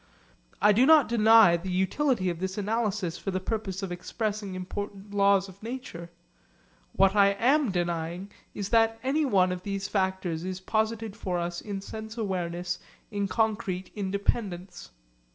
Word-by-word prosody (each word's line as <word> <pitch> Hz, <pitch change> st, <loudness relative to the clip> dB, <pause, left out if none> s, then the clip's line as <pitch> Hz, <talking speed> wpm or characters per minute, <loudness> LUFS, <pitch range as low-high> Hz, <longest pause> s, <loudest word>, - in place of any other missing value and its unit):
I 210 Hz, -, +5 dB
do 240 Hz, +6 st, +4 dB
not 310 Hz, -4 st, +7 dB
deny 220 Hz, -5 st, +6 dB
the 180 Hz, +3 st, -6 dB
utility 190 Hz, +2 st, +1 dB
of 170 Hz, -, -7 dB
this 190 Hz, +1 st, -3 dB
analysis 210 Hz, -4 st, -1 dB
for -, -, -4 dB
the 185 Hz, -1 st, -1 dB
purpose 195 Hz, -1 st, -3 dB
of 190 Hz, -, -4 dB
expressing 205 Hz, +2 st, -3 dB
important 200 Hz, +2 st, -6 dB
laws 200 Hz, -1 st, +3 dB
of 190 Hz, 0 st, -15 dB
nature. 220 Hz, -8 st, -7 dB, 0.8 s
What 195 Hz, +1 st, +4 dB
I 200 Hz, -1 st, +5 dB
am 260 Hz, +6 st, +2 dB
denying 175 Hz, +1 st, -2 dB, 0.2 s
is 200 Hz, -1 st, -4 dB
that 225 Hz, -1 st, +3 dB
anyone 260 Hz, -10 st, +2 dB
of 180 Hz, 0 st, -4 dB
these 195 Hz, 0 st, -3 dB
factors 190 Hz, -4 st, -1 dB
is 185 Hz, 0 st, -4 dB
posited 220 Hz, +1 st, -1 dB
for 185 Hz, -5 st, -3 dB
us 175 Hz, 0 st, -3 dB
in 200 Hz, -2 st, -5 dB
sense 220 Hz, +3 st, -8 dB
awareness 180 Hz, -4 st, -2 dB, 0.3 s
in 200 Hz, -1 st, -1 dB
concrete 205 Hz, -3 st, -1 dB
independence. 195 Hz, -2 st, -3 dB
200 Hz, 150 wpm, -27 LUFS, 185-220 Hz, 0.8 s, not